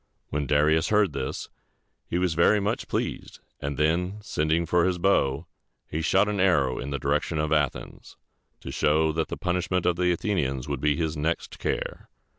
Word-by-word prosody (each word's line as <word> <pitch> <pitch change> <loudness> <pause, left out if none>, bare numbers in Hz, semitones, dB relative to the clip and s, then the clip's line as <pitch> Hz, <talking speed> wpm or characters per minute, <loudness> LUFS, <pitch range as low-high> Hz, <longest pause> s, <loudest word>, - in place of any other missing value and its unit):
When 75 -1 -2
Darius 75 +4 +3
heard 105 -2 +3
this, - - -4 0.6
he 85 - -1
was 90 -2 +1
very 85 +6 +4
much 100 +1 -2
pleased; - - -3 0.2
and 70 -1 -4
then, 85 +6 +1
sending 80 -3 0
for 85 +1 +2
his 90 0 +1
bow, 80 -7 +1 0.4
he 80 - -4
shot 95 +5 +3
an 105 -1 -2
arrow 75 -9 +2
in 70 - -5
the 70 - -2
direction 80 +4 -1
of 75 0 0
Athens, 75 -4 -2 0.4
to - - -7
show 80 +1 +2
that 80 0 -1
the - - -5
punishment 90 0 -1
of 85 -1 +2
the 90 0 +2
Athenians 75 - -1
would 70 -2 -3
be 75 -1 +2
his 80 -1 -1
next 80 +3 -2
care. - - -3
80 Hz, 180 wpm, -26 LUFS, 75-90 Hz, 0.6 s, very